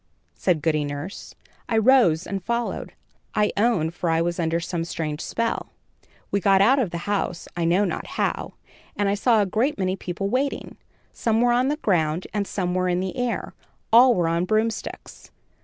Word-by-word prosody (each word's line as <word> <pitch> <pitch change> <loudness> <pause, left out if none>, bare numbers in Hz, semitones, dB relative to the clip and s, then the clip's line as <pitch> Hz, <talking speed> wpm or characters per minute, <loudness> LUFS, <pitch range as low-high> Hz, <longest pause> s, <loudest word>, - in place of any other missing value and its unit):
said 170 -6 0
Goody 155 -2 +1
Nurse. 145 +7 -6 0.3
I 225 - +1
rose 220 -8 +4
and 195 -2 -4
followed, 235 +2 -3 0.4
I 210 0 +2
own, 200 -8 +2
for 175 0 -3
I 165 0 +2
was 170 +1 -1
under 165 0 0
some 170 0 -3
strange 155 -2 -4
spell. 230 0 -2 0.6
"We 200 - +2
got 195 0 +4
out 250 +8 +5
of 230 -8 0
the 170 0 -6
house, 200 -4 -2
I 170 -1 -1
know 180 +5 +3
not - - -3
how, - - -1 0.4
and 205 - 0
I 200 - +2
saw 215 +1 +3
a - - 0
great 230 +9 0
many 185 -1 0
people 185 +1 -4
waiting. 260 +6 -2 0.4
Some 225 -1 0
were 240 0 +4
on 250 +2 +2
the 290 - +1
ground, 170 - 0
and 205 -2 -1
some 180 -3 -2
were 185 0 +1
in 175 0 +1
the 185 0 -3
air. 245 -1 -2 0.4
All 245 +1 +7
were 175 -3 +1
on 170 +2 +1
broomsticks. 220 +3 -3
195 Hz, 190 wpm, -24 LUFS, 170-225 Hz, 0.6 s, All